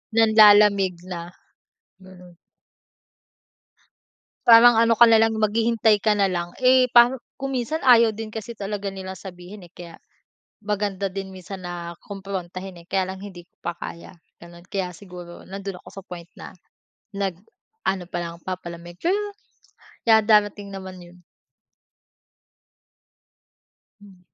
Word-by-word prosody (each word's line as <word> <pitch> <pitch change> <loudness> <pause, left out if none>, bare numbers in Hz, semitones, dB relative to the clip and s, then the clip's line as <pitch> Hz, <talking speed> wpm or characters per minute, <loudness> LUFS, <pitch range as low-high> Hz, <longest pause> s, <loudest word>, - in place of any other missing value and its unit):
Nanlalamig 210 -3 +6 0.2
na, 170 -1 -4 0.8
ganun. 180 -2 -16 2.1
Parang 230 0 +8
ano 230 0 +4
ka 235 - +7
nalang 225 -1 +5
maghihintay 220 0 +2
ka 215 0 +2
nalang, 180 -4 -1
eh, 255 0 +5
parang 240 +2 +6 0.2
kung 270 0 -5
minsan 270 +5 -3
ayaw 230 -4 +5
din 220 -1 -7
kasi 225 +1 -7
talaga 200 0 -5
nilang 190 -1 -7
sabihin, 180 0 -11
eh, - - -33
kaya 170 -1 -11 0.6
maganda 200 -2 -2
din 190 0 -7
minsan 185 0 -9
na 170 -1 -7
kumprontahin, 190 -2 -7
eh, 170 - -16
kaya 190 -1 -1
lang 190 - -8
hindi 190 -3 -10
ko - - -51
pa 170 - -5
kaya, 170 +2 -9 0.2
ganon 170 0 -14
kaya 185 -3 -3
siguro 180 -2 -11
nandoon 195 -1 -8
ako - - -14
sa 195 - -10
point 175 -1 -10
na - - -10 0.6
nag 195 -3 -2 0.5
ano 185 -2 -1
palang 170 -1 -5
papalamig 175 -2 -7
pero 350 +3 0 0.9
yeah, 220 -1 +5
darating 205 -2 +2
naman 190 -1 -8
yun. 175 0 -16 2.8
Hmm. 195 -3 -17
195 Hz, 130 wpm, -23 LUFS, 180-215 Hz, 2.8 s, Parang